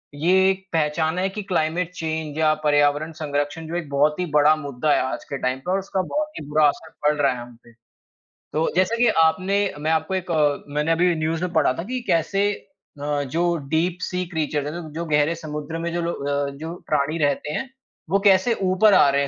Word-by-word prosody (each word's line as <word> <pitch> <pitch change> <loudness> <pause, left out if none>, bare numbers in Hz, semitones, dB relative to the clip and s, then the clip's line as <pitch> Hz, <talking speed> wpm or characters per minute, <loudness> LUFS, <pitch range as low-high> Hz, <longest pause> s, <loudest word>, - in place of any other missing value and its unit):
ये 185 +5 +4
एक 190 0 -2
पहचाना 160 +2 0
है 190 - +1
कि 210 +2 -5
क्लाइमेट 175 -1 -1
चेंज 160 -3 -4
या 155 -1 +4
पर्यावरण 145 +1 +2
संरक्षण 145 +2 -2
जो 165 - -5
एक 170 -4 -4
बहुत 150 +3 +2
ही 180 - 0
बड़ा 150 +1 +6
मुद्दा 145 -1 -2
है - - +2
आज 130 - -3
के 140 - -3
टाइम 130 +1 -1
पे 175 +7 -4
और 190 - +2
उसका 195 0 -2
बहुत 300 +11 -2
ही 150 - -8
बुरा 150 0 +4
असर 160 +2 -3 0.2
पड़ 150 - +4
रहा 140 -2 +4
है 125 - -7
हम 120 0 -11
पे। 120 - -19 0.8
तो 160 +1 +1
जैसे 185 +5 +2
कि - - +5 0.2
आपने 185 +5 +2 0.2
मैं 155 +2 0
आपको 160 +3 0
एक 185 -2 -3
अ, 150 -3 +1
मैंने 150 +2 0
अभी 175 +2 +3
न्यूज़ 160 +1 -1
में 180 - -2
पढ़ा 150 -5 +3
था 165 - -5
कि 250 +5 -4
कैसे 195 +5 +2 0.5
अ, 145 0 -1
जो 170 +6 0 0.2
डीप 170 +3 +1
सी 180 +1 -2
क्रीचर्स 150 -2 -1
हैं 150 - -4
जो 155 - -9
जो 170 - -2
गहरे 150 0 +2
समुद्र 155 -1 -6
में 170 +1 -3
जो 175 - -1
लो 170 0 -1
अ, 140 0 -2
जो 160 +3 -6
प्राणी 150 +1 0
रहते 145 -1 0
हैं, 265 +11 -3 0.4
वो 195 +3 +3
कैसे 190 +5 +4 0.2
ऊपर 200 +2 +5
आ 145 - +6
रहे 140 0 +2
हैं 140 - 0
160 Hz, 225 wpm, -23 LUFS, 145-180 Hz, 0.8 s, बड़ा